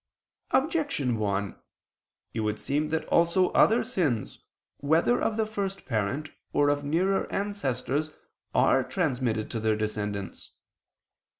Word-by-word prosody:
Objection 280 - +1
1: 100 -1 -1 0.8
It 115 - -3
would 105 -1 -1
seem 150 +2 -1
that 160 0 -1
also 170 +2 +3
other 225 +3 +4
sins, 160 - -1 0.3
whether 160 +11 +2
of 220 - 0
the 220 - +2
first 200 -2 -4
parent 120 +6 -2 0.2
or 145 0 +3
of 145 0 0
nearer 180 +7 +1
ancestors, 155 -7 -1 0.5
are 135 - +4
transmitted 125 - -1
to 115 - -2
their 110 0 +1
descendants. 105 -3 -4
145 Hz, 120 wpm, -27 LUFS, -, 0.8 s, other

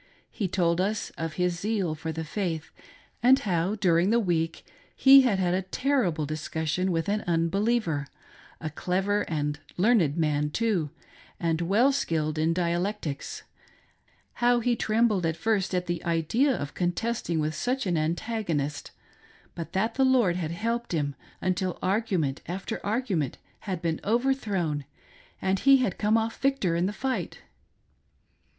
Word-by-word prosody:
He 205 - -2
told 175 -1 +1
us 205 +2 -1
of 165 -1 -5
his 180 -1 0
zeal 200 -5 -1
for 160 +1 -5
the 160 +1 -4
faith, 165 -2 -3 0.5
and 255 +3 +6
how, 185 -2 0
during 180 -3 +3
the 235 +2 +4
week, 165 -6 -1 0.3
he 275 0 +8
had 240 -7 +2
had 180 -2 +1
a 185 - +1
terrible 190 - 0
discussion 160 +4 -2
with 165 +1 -1
an 210 +1 0
unbeliever 170 -2 +1 0.3
— - - -22
a 155 -1 -4
clever 190 +6 0
and 150 -2 -1 0.2
learned 180 - +3
man, 150 -2 +1
too, 190 -4 0 0.5
and 165 -1 0
well 210 +10 +3
ski 170 - 0
lied 155 0 -2
in 160 +1 +2
dialectics 175 -2 -2 0.5
— - - -38
how 240 0 +4
he 240 +1 +1
trembled 215 -3 +2
at 165 0 0
first 205 -4 0
at 180 0 0
the 175 -1 -3
idea 170 - +2
of 145 - -3
contesting 175 0 -1
with 155 0 0
such 250 - -1
an 180 -3 0
antagonist, 165 -2 -2 0.6
but 165 - -7
that 205 +4 0
the 270 - +2
Lord 250 -9 +4
had 170 -3 -2
helped 230 +6 -2
him, 145 -3 0 0.3
until 185 0 -1
argument 185 -9 0
after 185 +2 -4
argument 200 - -1 0.3
had 180 -2 -3
been 165 -2 -1
overthrown 210 - 0 0.6
and 190 0 0
he 275 +4 +6
had 250 -8 -1
come 215 +1 +3
off 225 0 -2
victor 270 -11 +1
in 175 +2 +1
the - - -2
fight. 260 +4 -3
180 Hz, 155 wpm, -27 LUFS, 165-220 Hz, 0.6 s, he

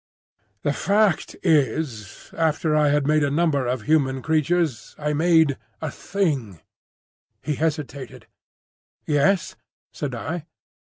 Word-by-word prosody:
"The 145 - +1
fact 200 +1 +1
is, 135 - 0
after 160 -1 +1
I 150 -1 +4
had 145 -1 +2
made 155 +1 +3
a 145 - +2
number 145 -3 +1
of 125 -2 -2
human 135 -1 +1
creatures 160 -3 0
I 150 0 -1
made 160 -2 +3 0.2
a 160 -3 -4
Thing—" 140 - -2 0.8
He 150 - -1
hesitated. 145 -5 -3 0.8
"Yes?" 155 +6 +2 0.4
said 140 -4 -4
I. 160 +7 -5
150 Hz, 115 wpm, -23 LUFS, 140-160 Hz, 0.8 s, I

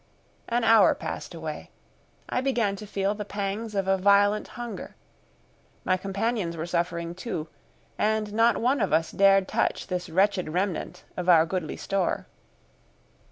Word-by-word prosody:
An 240 0 +1
hour 225 0 +6
passed - - -6
away. - - -6 0.6
I 250 - -1
began 240 -7 0
to 210 - -9
feel 195 0 0
the 210 0 -5
pangs 205 +2 -4
of 195 -1 0
a 195 0 +2
violent 205 +2 +4
hunger. 240 -1 -7 0.9
My 185 - +2
companions 195 -1 -2
were 160 - -3
suffering 170 -1 -2
too, 175 -4 -5 0.5
and 215 -1 0
not 230 +2 +4
one 255 +2 +1
of 195 - 0
us 160 +1 +2
dared 195 -1 +4
touch - - 0
this 180 0 -4
wretched 190 0 +2
remnant 180 0 -2
of 180 0 -2
our 165 -2 +7
goodly 170 -2 -3
store. 195 -3 -1
195 Hz, 150 wpm, -26 LUFS, 180-215 Hz, 0.9 s, our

